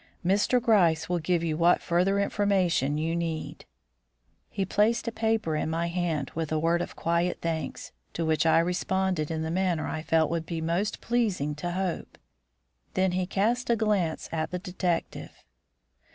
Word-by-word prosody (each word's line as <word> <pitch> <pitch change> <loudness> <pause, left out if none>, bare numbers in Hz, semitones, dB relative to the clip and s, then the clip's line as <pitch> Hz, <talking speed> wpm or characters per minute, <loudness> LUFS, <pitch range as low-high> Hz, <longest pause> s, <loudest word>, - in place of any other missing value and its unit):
Mr. 205 +7 +3
Gryce 185 -9 +3
will 175 -1 0
give 170 +1 0
you 160 -2 -1
what 170 +1 +4
further 185 +4 +1
information 185 -8 +1
you 165 +2 -1
need 165 -2 -4 0.4
" - - -50 0.3
He 195 - -2
placed 215 +6 +1
a - - 0
paper 220 -7 0
in 155 - -1
my 165 +1 -1
hand 170 -5 -2
with 160 -1 -3
a 155 - +1
word 165 +2 +1
of - - -5
quiet 170 +1 0
thanks, 160 -4 -4 0.2
to 165 - -2
which 160 +1 +2
I 160 - +5
responded 180 -1 0
in 160 -1 -2
the 160 - -3
manner 180 -2 0
I 155 - -3
felt 160 -1 +2
would 165 -1 -2
be 165 -2 -3
most 170 +6 -1
pleasing 210 -12 0
to 175 +3 -3
Hope. 185 -2 -3 0.8
Then 185 0 +2
he 180 0 -1
cast 230 +7 0
a 235 - +4
glance 205 -7 0
at 160 -1 -1
the 180 - -3
detective. 180 -1 -3
175 Hz, 175 wpm, -27 LUFS, 160-195 Hz, 0.8 s, I